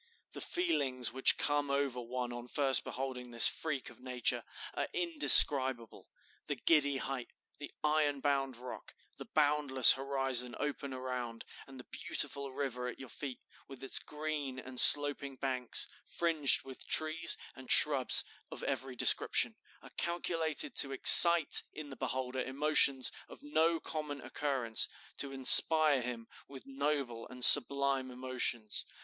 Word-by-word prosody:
The - - -11
feelings 135 - -4
which 130 0 +2
come 145 -1 -4
over 140 -3 -5
one 120 0 -9
on 120 0 -12
first 135 0 -3
beholding 130 -1 -9
this 115 -1 +3
freak 145 -5 -6
of - - -21
nature 125 -2 -5 0.3
are - - -6
indescribable. 145 - +4 0.4
The - - -6
giddy 145 -4 -2
height, 130 -2 -8 0.3
the 145 - -12
iron 150 -2 -3
bound 135 -3 -5
rock, 125 +1 -13 0.2
the - - -11
boundless 145 -4 +3
horizon 135 -2 -2
open 145 -1 -8
around, 125 -3 -9 0.2
and 135 -1 -16
the - - -12
beautiful 140 +2 -5
river 130 -2 -8
at 125 - -10
your 130 - -14
feet, 135 -1 -11 0.3
with 135 -1 -15
its 135 - +3
green 150 -3 -9
and 130 -1 -7
sloping 145 -1 +4
banks, 130 -2 -5 0.2
fringed 160 -5 -2
with 130 -1 -12
trees 155 +1 -2 0.2
and 130 -1 -17
shrubs 140 -4 +4 0.3
of - - -12
every 135 -1 -7
description, - - +1 0.3
are - - -17
calculated 170 - -5
to 135 -1 +3
excite 170 +3 +7
in 155 -2 -12
the 135 - -12
beholder 130 +1 -7
emotions 140 -1 0 0.2
of - - -17
no 160 +3 -3
common 150 -3 -9
occurrence, 130 -6 -3 0.3
to 140 - -4
inspire 145 +2 +7
him 120 -1 -9 0.2
with 135 -1 -15
noble 135 -4 -7
and 125 -1 +3
sublime 140 -2 +4
emotions. 125 -3 -5
135 Hz, 140 wpm, -29 LUFS, 125-145 Hz, 0.4 s, excite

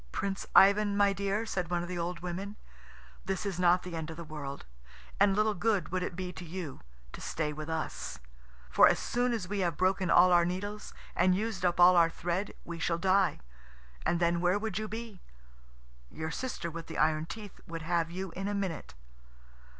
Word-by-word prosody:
"Prince 195 -1 -3
Ivan, 200 +1 +6
my 200 -1 +4
dear," 200 +3 -1
said 180 -6 -2
one 175 -1 0
of - - -5
the 180 -1 -4
old 170 0 -3
women, 185 +4 -5 0.7
"this 190 +2 -2
is 190 -3 -3
not 180 0 +4
the 180 -2 -6
end 160 -1 -4
of 160 - -7
the 170 - -6
world, 150 -3 -7 0.5
and 200 -1 +5
little 215 +1 +2
good 205 0 0
would 185 0 -1
it 180 - -3
be 180 0 -5
to 175 - -8
you 170 -4 -6 0.3
to - - -8
stay 150 -2 -2
with 155 +1 -6
us. 160 - -4 0.5
For - - +7
as - - +3
soon 245 +1 0
as 220 -6 -2
we 205 +1 -2
have 175 -5 0
broken 185 -1 +1
all 180 +2 +6
our 175 -1 +6
needles 205 +4 -4 0.2
and 180 +1 +4
used 215 -1 -2
up 175 -1 +1
all 180 +1 +8
our 170 -1 +6
thread 175 +4 -3
we 170 -1 -6
shall 170 0 0
die, 190 +1 +2 0.6
and 170 0 +1
then 170 0 +2
where 180 +2 +3
would 215 -1 -3
you 215 - -3
be? 220 -3 -7 0.9
Your 160 0 -5
sister 210 -9 -4
with 165 0 -7
the - - -6
iron 155 +1 +2
teeth 210 -1 -9
would 165 -1 -6
have 165 0 0
you 185 +1 -5
in 195 +3 -4
a 205 - -1
minute." 190 - -4
180 Hz, 205 wpm, -31 LUFS, 170-200 Hz, 0.9 s, all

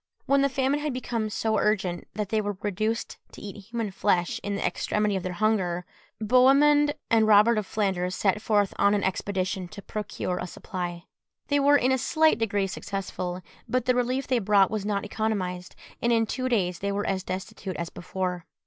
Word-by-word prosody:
When 275 0 +3
the 280 - +3
famine 270 +2 +1
had 295 -2 -2
become 230 -3 -2
so 220 0 0
urgent 190 -5 0
that 210 -2 -3
they 220 -1 +1
were 205 -2 -3
reduced 215 +3 -2
to - - -11
eat 205 -1 -8
human 230 -3 -3
flesh 185 -3 +1
in 205 0 -3
the - - -2
extremity 210 -1 0
of 190 - -1
their 185 0 -4
hunger, 180 -4 0 0.3
Bohemund 275 +6 +5 0.2
and 220 -1 +4
Robert 215 +2 +6
of 205 - -5
Flanders 185 -3 -1
set 205 +1 +1
forth 205 -3 +2
on 200 +1 +4
an 205 - 0
expedition 190 -1 -2
to 200 +2 -11
procure 205 -3 -4
a 180 - -4
supply. 175 -2 -5 0.5
They 285 0 +3
were 285 +1 +5
in 255 -1 +2
a 260 - +2
slight 315 +3 +3
degree 205 -3 +1
successful; 185 -2 -4 0.3
but 255 -1 0
the 250 - +3
relief 250 +2 0
they 255 -3 +1
brought 200 -2 +4
was 210 -2 -2
not 205 -1 -1
economised, 190 -4 -3 0.3
and 240 - +2
in 225 -1 +3
two 255 +3 -2
days 180 -7 0
they 200 0 -2
were 205 +1 -2
as 190 -1 -1
destitute 185 0 -5
as 170 0 -4
before. 180 -1 -4
210 Hz, 195 wpm, -26 LUFS, 190-235 Hz, 0.5 s, Robert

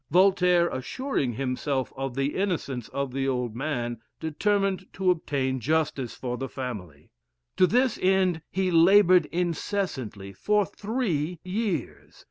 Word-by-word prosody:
Voltaire, 180 -1 +4
assuring 135 - -2
himself 130 +2 -2
of 135 -2 -4
the 135 +1 0
innocence 155 - -2
of 140 -2 -3
the 135 0 -1
old 125 -4 -1
man, 120 -4 -2 0.2
determined 195 +4 0
to 185 -1 +2
obtain 135 -6 -1
justice 150 -1 -1
for 125 -1 -4
the 135 0 -4
family. 95 - -7 0.5
To 185 - +6
this 250 +3 +2
end 185 -3 +2
he 185 0 0
labored 180 0 +6
incessantly 165 - -3
for 205 - +1
three 180 - -2
years. 185 - -3
160 Hz, 125 wpm, -26 LUFS, 130-190 Hz, 0.5 s, To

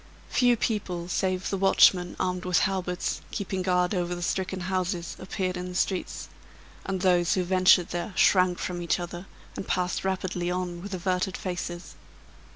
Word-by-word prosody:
Few 245 -1 +4
people, 185 -7 -2
save 185 0 -1
the 195 - -1
watchmen, 185 -2 +5
armed 180 0 -1
with 180 -1 +2
halberts, 185 -2 -1
keeping 190 -1 -3
guard 180 0 +1
over 175 -1 -1
the 175 - -5
stricken 190 +1 -2
houses, 180 -1 -2
appeared 185 -1 -3
in 180 0 -5
the 180 - -8
streets; 185 0 -1 0.6
and 190 -1 -2
those 180 -2 +3
who 185 - +1
ventured 185 -1 +4
there, 175 +5 -3
shrank 180 -2 +4
from 175 -1 -4
each 170 - 0
other, 175 +1 -6 0.3
and - - -6
passed 180 0 -1
rapidly 185 -2 -2
on 180 -1 -3
with 200 0 -5
averted 185 +1 -1
faces. 175 -1 -5
180 Hz, 160 wpm, -27 LUFS, 175-190 Hz, 0.6 s, watchmen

